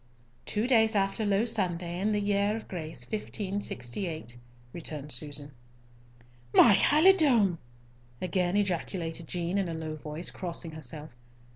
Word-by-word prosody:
"Two 210 +2 0
days 225 -3 +4
after 200 +2 +1
Low 200 +3 +2
Sunday, 175 -6 -1
in 210 +3 +1
the 210 - +1
year 205 +1 +1
of 225 - -9
grace 155 -8 -6
1568," 175 - -4 0.4
returned 150 -3 -5
Susan. 145 +2 -3 1.0
"My 230 - +8
halidome!" 280 - +5 0.6
again 185 0 0
ejaculated 170 -4 -2
Jean, 175 +3 -1
in 190 -3 -1
a 165 - -3
low 160 -1 -4
voice, 155 +3 -6
crossing 170 -2 -4
herself. 155 0 -7
180 Hz, 125 wpm, -29 LUFS, 160-205 Hz, 1.0 s, My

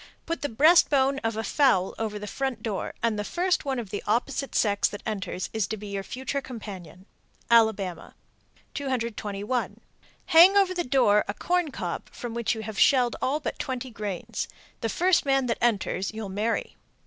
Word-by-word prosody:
Put 335 - -3
the 290 - -2
breast 310 +9 +5
bone 275 -1 +2
of 225 -2 -2
a 220 - -2
fowl 200 -6 +2
over 215 -2 -2
the 210 - -6
front 250 +1 -3
door, 210 -4 -3
and 225 -2 +1
the - - -1
first 355 - 0
one 270 -2 -1
of 225 -5 -5
the 205 - -3
opposite 240 +5 -1
sex 205 -2 +3
that 205 - -8
enters 195 -3 -4
is 220 -3 0
to 220 - -4
be 210 0 -8
your 200 -1 -3
future 265 +6 -4
companion. 190 - -9 0.5
Alabama. 205 -7 +2 0.6
221. 235 -4 -3 0.5
Hang 355 +5 +7
over 390 -2 +4
the 355 -1 -1
door 245 -7 +3
a 200 - -3
corn 355 - 0
cob - - -5
from 240 -2 -7
which 235 -1 0
you 220 - -5
have 215 -2 -5
shelled 250 -4 +4
all 285 +4 +1
but 295 - -5
twenty 260 -1 -4
grains. 205 -5 -4 0.3
The 225 - -2
first 360 - +3
man 270 -1 +2
that 230 - -1
enters 205 -4 0
you'll 220 -2 -6
marry. 215 +4 -2
230 Hz, 185 wpm, -26 LUFS, 210-270 Hz, 0.6 s, Hang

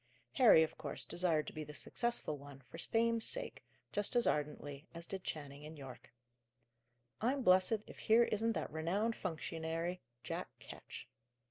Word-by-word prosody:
Harry, 230 -11 +8
of 160 - -4
course, 145 -3 -4
desired 170 -4 +1
to - - -7
be 155 - -4
the 150 0 -9
successful 235 -8 -1
one, 140 -1 -11
for - - -8
fame's 230 0 +2
sake, - - -1 0.3
just 205 +3 0
as 240 - +5
ardently 145 -1 -1
as 170 0 -4
did 190 0 -5
Channing 145 -2 -5
and 155 +1 -9
Yorke. 135 -3 -10 1.1
"I'm 260 +4 +1
blessed 190 +2 +5
if - - -12
here 225 +2 +6
isn't 225 0 +1
that - - -3
renowned 195 +8 0
functionary, 165 0 -3 0.2
Jack - - -3
Ketch!" - - -9
170 Hz, 155 wpm, -37 LUFS, 150-225 Hz, 1.1 s, Harry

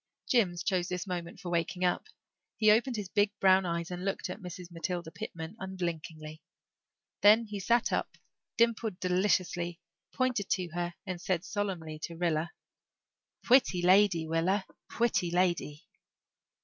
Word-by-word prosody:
Jims 180 -8 +2
chose 180 -2 0
this 180 +1 -3
moment 175 -2 -5
for 175 - -6
waking 175 +2 0
up. 180 - 0 0.5
He 215 -1 +5
opened 240 +4 +2
his 205 -3 -4
big 205 +1 +2
brown 190 -1 +5
eyes 170 0 -2
and 180 0 -5
looked 195 -1 -2
at - - -8
Mrs. 180 -1 -8
Matilda 170 0 -4
Pitman 160 +3 -7
unblinkingly. 160 -4 -5 0.8
Then 215 +3 +7
he 210 -2 -6
sat 235 +5 +2
up, - - -2 0.4
dimpled 230 -4 +1
deliciously, 180 -2 0 0.3
pointed 250 -7 0
to 180 -2 0
her 175 +1 -3
and 185 -3 -5
said 185 -1 -1
solemnly 180 -8 -3
to 165 +2 -6
Rilla, 165 -1 0 1.0
"Pwitty 240 -8 +4
lady, 185 -2 +5
Willa, 175 +5 +1 0.3
pwitty 230 -7 +1
lady." 175 -4 0
180 Hz, 140 wpm, -30 LUFS, 170-205 Hz, 1.0 s, Then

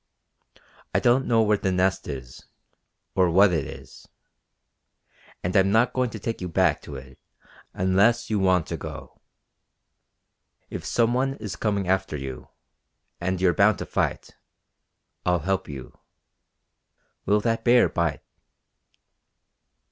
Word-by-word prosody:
I - - +5
don't 125 +2 +2
know 115 -1 +4
where 105 -1 +2
the 95 - 0
Nest 95 +1 0
is, 65 -4 -8 0.7
or 95 -2 +3
what 95 +2 +5
it 80 -5 -1
is. - - -12 1.4
And 90 +3 -2
I'm 95 0 +4
not 115 +3 +3
going 125 -1 0
to 110 - -7
take 115 +1 -4
you 90 - -4
back 90 -2 +2
to 70 - -9
it 65 -1 -11 0.6
unless 100 +6 +2
you 105 -1 0
want 95 -3 +2
to - - -5
go. - - -9 1.5
If - - -5
some 120 0 +1
one 135 +2 0
is 105 -6 -6
coming 100 -3 -1
after 95 -4 0
you, 65 -2 -7 0.7
and 95 +1 -2
you're 90 -1 +3
bound 105 0 +4
to - - -5
fight. - - -2 0.9
I'll 90 0 +2
help 95 +1 -1
you. 70 -3 -9 1.3
Will 105 +2 +4
that 115 0 -1
bear 120 0 +5
bite?" 85 -3 -2
95 Hz, 135 wpm, -25 LUFS, 90-110 Hz, 1.5 s, I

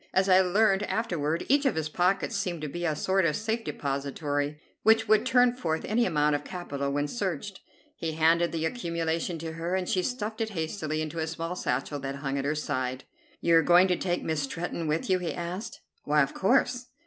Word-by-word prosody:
As 190 +1 +3
I 185 0 +6
learned 195 +2 +3
afterward, 170 -8 -1
each 280 +2 +4
of - - +1
his 160 -1 -1
pockets 180 +5 +1
seemed 180 -5 -2
to - - -2
be 175 +4 -4
a 155 -2 +1
sort 190 +5 +1
of 155 -3 +2
safe 225 +2 -2
depository, 145 0 -2 0.2
which 225 0 +4
would 215 +3 +4
turn 250 -1 +5
forth 160 -10 -2
any 235 +3 +2
amount 150 -3 +2
of 145 - -1
capital 140 -7 -4
when 145 +1 0
searched. 195 0 -3 0.4
He 160 -1 -3
handed 165 +2 +3
the 160 -1 -2
accumulation 170 -4 -2
to 160 0 -5
her, 170 +3 -2
and 185 -1 -1
she 185 - +1
stuffed 220 0 -3
it 220 - 0
hastily 160 -3 -3
into 155 +2 -5
a 160 - -1
small 165 +2 -4
satchel 145 -4 -2
that 135 0 -4
hung 140 0 -2
at 135 - -3
her 150 +2 0
side. 130 -3 -2 0.4
"You 170 -1 +4
are - - +6
going 175 +3 +6
to 180 - +3
take 175 0 -2
Miss 160 -2 -1
Stretton 165 +3 -3
with 155 +2 -1
you?" 185 -1 +2
he 175 -2 -3
asked. 175 +4 -5 0.2
"Why, 150 0 +3
of 135 - -4
course." 250 +3 +2
170 Hz, 210 wpm, -28 LUFS, 150-195 Hz, 0.4 s, I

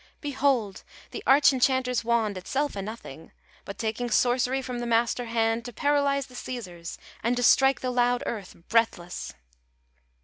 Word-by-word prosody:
"Behold 265 -8 0 0.3
The - - -6
arch 275 +1 +6
enchanter's 255 -1 +1
wand! 230 -3 +1
Itself 270 +10 -2
a 200 - -3
nothing; 195 -8 -9 0.3
But 200 - -7
taking 225 +2 -2
sorcery 250 +3 +2
from 250 -1 -5
the 240 - -3
master 235 +1 +1
hand 225 0 0
To 245 - -7
paralyze 280 +1 +1
the 255 - -17
Caesars, 185 -10 -7 0.2
and 240 +2 0
to 245 - 0
strike 270 +2 +5
The 255 - -1
loud 245 0 +1
earth 205 -5 -5
breathless!" 220 -6 0
245 Hz, 150 wpm, -26 LUFS, 225-260 Hz, 0.3 s, arch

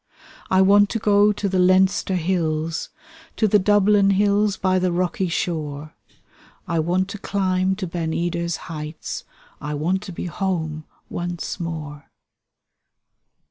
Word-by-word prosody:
I 190 0 +4
want 205 +1 +5
to 230 - -1
go 205 -1 +4
to 205 0 -2
the 190 -1 0
Leinster 185 +1 +3
hills. 165 -2 -1 0.5
To 220 - +2
the 210 +1 +4
Dublin 205 0 +4
hills 200 +1 +2
by 185 -1 +1
the 180 -1 +1
rocky 180 +1 0
shore. 155 -3 -3 0.7
I 170 -1 0
want 180 +4 +1
to 205 - -7
climb 190 -1 0
to 190 -1 -4
Ben 165 -2 -3
Edar's 170 0 -1
heights 155 -1 -6 0.2
— - - -27
I 150 0 -3
want 175 +6 0
to 205 - -8
be 170 - -6
home 160 -4 -3 0.2
once 175 -1 -4
more. 155 -4 -6
185 Hz, 140 wpm, -22 LUFS, 165-195 Hz, 0.7 s, want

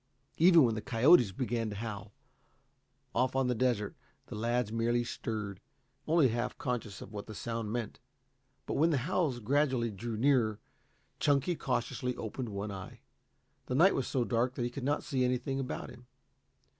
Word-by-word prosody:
Even 170 -1 +7
when 115 -3 +3
the 110 - -3
coyotes 120 - +5
began 115 +1 -2
to 105 - -6
howl, 105 -2 -6 1.0
off 130 +1 +1
on 135 0 +2
the 125 - +1
desert, 115 -4 0 0.3
the - - -8
lads 115 +1 0
merely 120 +1 +1
stirred, 105 -4 -4 0.5
only 155 -4 +4
half 120 +1 -2
conscious 120 -6 -3
of 105 - -13
what 105 -1 -6
the 110 - -8
sound 115 -2 -3
meant. 120 -2 -4 0.7
But - - -2
when 160 +4 +4
the 155 - +2
howls 165 -8 0
gradually 130 -1 +1
drew 110 +3 -5
nearer, 115 -4 +2 0.6
Chunky 145 +4 +2
cautiously 125 -1 -2
opened 115 +2 -5
one 100 +1 -4
eye. 95 -1 -8 0.7
The 125 - -1
night 180 +8 +6
was 130 - -1
so 130 - 0
dark 120 +2 0
that 120 - -2
he 120 - -3
could 130 +1 -6
not 145 +2 0
see 130 -4 0
anything 125 +2 0
about 130 - -4
him. 125 0 -15
120 Hz, 170 wpm, -32 LUFS, 110-135 Hz, 1.0 s, Even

